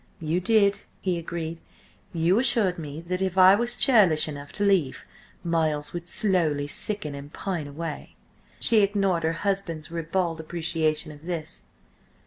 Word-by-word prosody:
"You 165 +1 -1
did," 200 +1 +2 0.2
he 180 -3 -2
agreed. 165 0 -6 0.5
"You 170 +4 +1
assured 215 -8 +4
me 150 0 -7
that 180 +2 -3
if 190 -1 -2
I 185 0 +7
was 235 +3 +1
churlish 190 - +4
enough 145 -1 -8
to 205 - -2
leave, 190 -9 0 0.4
Miles 160 -3 -1
would 175 0 -6
slowly 175 -9 +2
sicken 155 +1 0
and 140 +1 -10
pine 175 -6 -5
away!" 155 +1 -7 0.4
She 225 -2 +4
ignored 195 -4 0
her 160 0 -1
husband's 180 -6 0
ribald 165 0 -2
appreciation 160 -1 -1
of 150 +3 -14
this. 165 -3 -6
170 Hz, 145 wpm, -25 LUFS, 155-190 Hz, 0.5 s, I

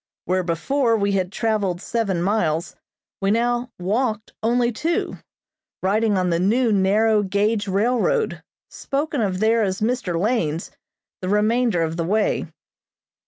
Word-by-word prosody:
Where 185 +1 +1
before 230 - +1
we 200 -1 0
had 190 -2 0
traveled 205 -5 -1
seven 200 -5 -1
miles 175 -4 0 0.5
we 195 - +1
now 240 +3 +1
walked 215 +4 -1
only 235 +1 +2
two, 320 +9 -2 0.6
riding 210 +2 +2
on 180 -1 +1
the 170 - +1
new 225 +6 +2
narrow 210 +3 +3
gauge 205 +2 0
railroad, 250 - +1 0.3
spoken 285 -1 -2
of 190 -3 -1
there 225 +2 +3
as 190 -2 -1
Mr. 215 -7 -1
Lane's, 175 -7 -1 0.5
the 185 - -3
remainder 215 -2 +2
of 165 0 -3
the 170 - 0
way. 205 +5 0
210 Hz, 135 wpm, -22 LUFS, 185-235 Hz, 0.6 s, narrow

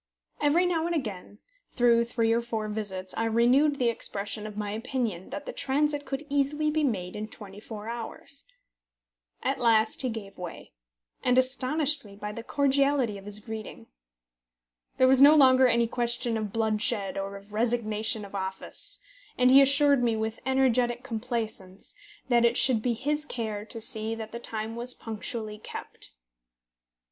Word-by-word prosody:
Every 305 +5 +3
now 335 -2 0
and 345 - -1
again, 205 - -5 0.4
through 235 -1 +4
three 230 -1 +1
or 235 - +1
four 225 -2 -3
visits, 190 -3 -4
I 225 - 0
renewed 250 +6 +3
the 245 -3 +2
expression 210 -1 -2
of 210 -1 -9
my 210 -1 -3
opinion 225 -4 -3
that 290 0 -6
the - - -6
transit 290 +1 0
could 275 +2 -4
easily 290 +2 0
be 310 0 0
made 185 -9 -2
in 215 +1 -4
twenty 205 -2 -11
four 215 0 -8
hours. 235 +4 -5 1.0
At 270 +2 -1
last 225 -2 +3
he 260 - -1
gave 205 -4 -8
way, 175 -2 -8 0.5
and 250 0 +2
astonished 275 +3 +3
me 200 -2 -13
by 210 +1 -6
the 230 - -7
cordiality 275 -4 +1
of 195 - -15
his 205 0 0
greeting. 220 - -8 1.1
There 255 - +5
was 265 0 +5
no 290 +2 +9
longer 260 -3 +6
any 235 -1 +3
question 240 0 -1
of 215 -2 -3
bloodshed 215 -2 0
or 195 0 -4
of 200 +1 -16
resignation 220 -2 0
of 200 - -13
office, 190 -1 -6 0.4
and 250 0 +5
he 270 +1 +9
assured 280 0 +5
me, 235 -2 +1
with 220 0 -3
energetic 250 -2 +2
complaisance, 220 -5 -4 0.3
that 240 -2 +3
it 235 0 +3
should 245 -5 +4
be 240 +1 0
his 295 +5 -1
care 220 -7 -4
to 225 +1 -6
see 220 0 -1
that 220 -1 -7
the 235 - -6
time 220 -1 -4
was 240 +1 +1
punctually 220 -1 -5
kept. - - -8
235 Hz, 165 wpm, -27 LUFS, 215-265 Hz, 1.1 s, no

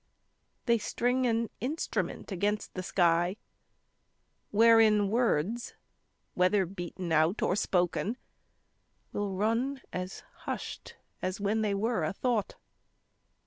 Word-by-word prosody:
They 235 -2 +3
string 250 +4 0
an 230 -1 0
instrument 275 -3 -3
against 205 +3 -1
the 185 - -3
sky 175 +1 +2 1.1
Wherein 215 -2 +5
words 230 -1 0 0.6
whether 185 +2 +3
beaten 175 -1 -6
out 160 +5 +3
or 185 - +2
spoken 195 +4 0 1.0
Will 205 -2 -2
run 230 +7 0
as 185 +1 -5 0.2
hushed - - -5 0.3
as 185 +2 -2
when 205 +2 +1
they 205 -2 +1
were 225 +3 0
a 200 - -1
thought. 230 -1 -1
205 Hz, 105 wpm, -30 LUFS, 185-230 Hz, 1.1 s, Wherein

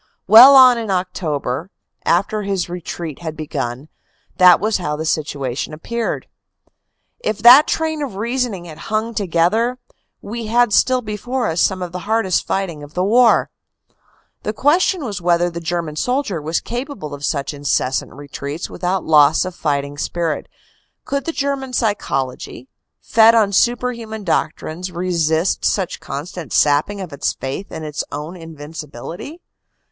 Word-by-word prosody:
Well 240 +7 +10
on 255 -2 +8
in 225 -2 -5
October, 170 -5 -2 0.4
after 200 +5 +1
his 195 -3 -2
retreat 170 -3 -6
had 160 -2 -6
begun, 140 -3 -4 0.5
that 180 -2 +7
was 215 +2 0
how 150 -5 -3
the 155 +1 -4
situation 145 -3 -2
appeared. 235 +9 -4 0.9
If 215 - -2
that 255 +6 +9
train 315 -1 -1
of 270 -9 -4
reasoning 230 -3 -2
had 160 -2 -10
hung 220 +2 -1
together, 210 +6 +1 0.4
we 230 +1 -6
had 235 -1 +3
still 255 +3 +3
before 235 +4 -3
us 165 +1 0
some 185 -1 +1
of 175 - -6
the 180 - -5
hardest 220 -5 +1
fight 195 -2 -1
ing 150 -2 -11
of 145 +1 -12
the 180 - +1
war. 235 +4 +4 0.9
The 215 - -3
question 310 - +2
was 205 -5 -5
whether 175 0 +2
the 170 - -5
German 165 -2 -3
soldier 245 - -1
was 160 +3 -1
capable 240 - -6
of 145 0 -8
such 140 0 -2
incessant 140 -2 -1
retreats 145 +2 -7
without 180 +1 -2
loss 155 +1 +5
of 185 - -5
fighting 145 -3 -2
spirit 170 -1 -2 0.6
could 280 0 -2
the 330 - -1
German 275 -3 -3
psychology, 135 - -2 0.3
fed 225 0 +5
on 215 -3 +3
superman 235 -1 0
doc 165 -3 +1
trines, 180 +4 -6
resist 170 -1 0
such 190 -4 0
constant 155 +3 -7
sapping 150 +8 +2
of 180 -6 -7
its 140 - -1
faith 135 +9 -6
in 160 - -6
its 150 -1 -3
own 150 +5 -6
in 165 -2 -10
vincibility? 155 - -8
180 Hz, 150 wpm, -19 LUFS, 155-230 Hz, 0.9 s, Well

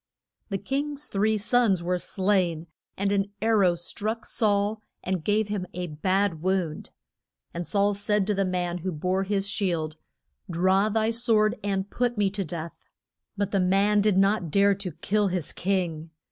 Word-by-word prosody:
The 195 - -1
king's 285 +7 -3
three 215 +2 +1
sons 210 -4 +2
were 180 +1 0
slain, 185 -4 0 0.3
and 200 0 0
an 200 -1 +1
ar 220 0 +2
row 180 -3 +4
struck 215 +6 -4
Saul 210 0 +1 0.2
and 185 -3 -2
gave 210 +2 +1
him 205 -3 -3
a 180 0 -2
bad 180 +2 0
wound. 180 -4 -1 0.6
And 170 0 -4
Saul 205 0 +2
said 205 0 0
to 210 - +1
the 195 0 +1
man 180 -1 -2
who 185 +2 -3
bore 185 +4 -1
his 200 0 0
shield, 170 -6 -1 0.5
Draw 190 +4 +2
thy 220 +1 +1
sword 225 -2 +2
and 195 -1 -1
put 245 -1 0
me 200 -2 +2
to 200 0 -2
death. 165 -1 -7 0.5
But 200 -1 -1
the 195 - +2
man 195 +3 +3
did 205 -2 +2
not 195 -3 +2
dare 200 +5 +4
to 195 -2 -5
kill 205 +6 0
his 180 -4 -1
king. 175 -4 -1
195 Hz, 170 wpm, -26 LUFS, 180-210 Hz, 0.6 s, row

